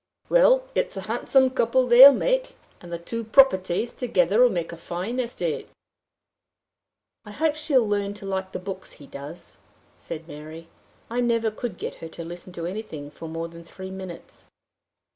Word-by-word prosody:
Well, -, -, +5 dB
it's -, -, -1 dB
a -, -, -3 dB
handsome 250 Hz, +5 st, +2 dB
couple 255 Hz, 0 st, +2 dB
they'll 250 Hz, +3 st, +10 dB
make! -, -, 0 dB, 0.3 s
And 175 Hz, -, -11 dB
the 170 Hz, -, -3 dB
two 230 Hz, +7 st, -5 dB
properties 220 Hz, -4 st, +3 dB
together'll 220 Hz, 0 st, +3 dB
make 170 Hz, -5 st, -3 dB
a -, -, -7 dB
fine 180 Hz, +9 st, -4 dB
estate!" 180 Hz, -10 st, -3 dB, 1.5 s
"I 210 Hz, -, -12 dB
hope 310 Hz, +8 st, 0 dB
she'll 295 Hz, -7 st, +2 dB
learn 205 Hz, -1 st, -1 dB
to 205 Hz, -1 st, -10 dB
like 190 Hz, -1 st, -3 dB
the -, -, -4 dB
books 190 Hz, 0 st, -7 dB
he 145 Hz, -, -14 dB
does," 140 Hz, +5 st, -10 dB, 0.4 s
said 165 Hz, 0 st, -8 dB
Mary. 160 Hz, +2 st, -10 dB, 0.4 s
"I 240 Hz, +2 st, -1 dB
never 230 Hz, -2 st, +1 dB
could 215 Hz, -3 st, -5 dB
get -, -, -6 dB
her 165 Hz, -, -6 dB
to 165 Hz, +1 st, -8 dB
listen 175 Hz, +2 st, -9 dB
to 170 Hz, -1 st, -5 dB
anything 175 Hz, -7 st, -6 dB
for 165 Hz, +2 st, -9 dB
more 165 Hz, +1 st, -4 dB
than 170 Hz, 0 st, -12 dB
three 190 Hz, +3 st, -9 dB
minutes." 190 Hz, -3 st, -9 dB
195 Hz, 165 wpm, -25 LUFS, 170-245 Hz, 1.5 s, they'll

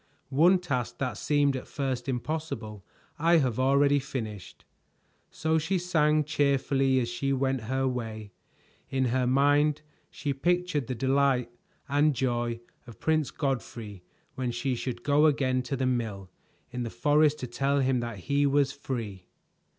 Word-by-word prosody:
"One 165 Hz, +8 st, +5 dB
task 140 Hz, -10 st, -3 dB
that 130 Hz, -2 st, -2 dB
seemed 145 Hz, -2 st, +1 dB
at 130 Hz, -, -6 dB
first 130 Hz, -2 st, -3 dB
impossible 125 Hz, -6 st, -4 dB, 0.4 s
I 165 Hz, +2 st, +5 dB
have 130 Hz, -6 st, 0 dB
already 140 Hz, +2 st, +4 dB
finished." 110 Hz, -7 st, -7 dB, 0.6 s
So 160 Hz, +1 st, 0 dB
she 170 Hz, +5 st, 0 dB
sang 155 Hz, -4 st, +2 dB
cheerfully 140 Hz, -2 st, +1 dB
as 120 Hz, -, -1 dB
she 130 Hz, +4 st, -2 dB
went 135 Hz, -1 st, 0 dB
her 130 Hz, +3 st, 0 dB
way. 110 Hz, -4 st, -4 dB, 0.6 s
In 130 Hz, -1 st, 0 dB
her 130 Hz, -1 st, +1 dB
mind 145 Hz, +3 st, +3 dB, 0.3 s
she 145 Hz, -1 st, -3 dB
pictured 175 Hz, -2 st, 0 dB
the 130 Hz, -, -3 dB
delight 130 Hz, -1 st, +1 dB, 0.4 s
and 145 Hz, +1 st, +2 dB
joy 120 Hz, -2 st, -1 dB, 0.3 s
of 115 Hz, -, -12 dB
Prince 155 Hz, -2 st, +1 dB
Godfrey 115 Hz, -, -4 dB, 0.3 s
when 130 Hz, -1 st, -2 dB
she 120 Hz, +2 st, -1 dB
should 120 Hz, -1 st, -4 dB
go 150 Hz, +2 st, +4 dB
again 130 Hz, -3 st, +1 dB
to 125 Hz, +2 st, -3 dB
the 130 Hz, -, 0 dB
mill 110 Hz, -7 st, -2 dB, 0.4 s
in 125 Hz, 0 st, -4 dB
the 120 Hz, -, -3 dB
forest 150 Hz, +3 st, +3 dB
to -, -, -2 dB
tell 140 Hz, +3 st, 0 dB
him 130 Hz, -1 st, +2 dB
that 120 Hz, -5 st, -5 dB
he 140 Hz, +6 st, +1 dB
was 140 Hz, -1 st, +2 dB
free. 115 Hz, -10 st, -6 dB
135 Hz, 150 wpm, -28 LUFS, 120-145 Hz, 0.6 s, One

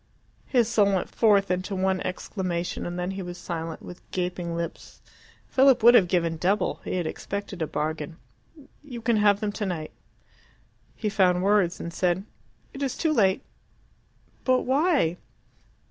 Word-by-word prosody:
His 240 Hz, -4 st, +3 dB
soul 205 Hz, -4 st, +3 dB
went 185 Hz, -, -2 dB
forth 200 Hz, -4 st, +3 dB
into 185 Hz, +2 st, -2 dB
one 190 Hz, 0 st, 0 dB
exclamation, 180 Hz, -2 st, -3 dB
and 175 Hz, 0 st, -5 dB
then 180 Hz, +1 st, -2 dB
he 195 Hz, 0 st, -5 dB
was 175 Hz, -1 st, -6 dB
silent, 165 Hz, -2 st, -5 dB
with 180 Hz, -, -10 dB
gaping 180 Hz, -2 st, -3 dB
lips. 170 Hz, 0 st, -6 dB, 0.5 s
Philip 265 Hz, -3 st, +4 dB
would 240 Hz, +1 st, +9 dB
have 200 Hz, -7 st, +6 dB
given 170 Hz, -2 st, 0 dB
double: 190 Hz, +6 st, 0 dB
he -, -, -3 dB
had 180 Hz, -2 st, -1 dB
expected 200 Hz, +2 st, -5 dB
a 160 Hz, -, 0 dB
bargain. 155 Hz, +1 st, -3 dB, 0.7 s
"You 255 Hz, -5 st, -7 dB
can 230 Hz, -1 st, +2 dB
have 205 Hz, -1 st, +4 dB
them 210 Hz, -1 st, -1 dB
tonight." 185 Hz, -7 st, -4 dB, 1.0 s
He 215 Hz, -, -3 dB
found 185 Hz, -4 st, +3 dB
words, 195 Hz, -3 st, +2 dB
and 170 Hz, -, -6 dB
said, 180 Hz, +1 st, +1 dB, 0.5 s
"It 275 Hz, -, -8 dB
is 270 Hz, -2 st, -2 dB
too 320 Hz, -2 st, +1 dB
late." 195 Hz, -8 st, +3 dB, 1.0 s
"But 255 Hz, -1 st, +3 dB
why?" 270 Hz, -, +2 dB
190 Hz, 155 wpm, -26 LUFS, 175-215 Hz, 1.0 s, would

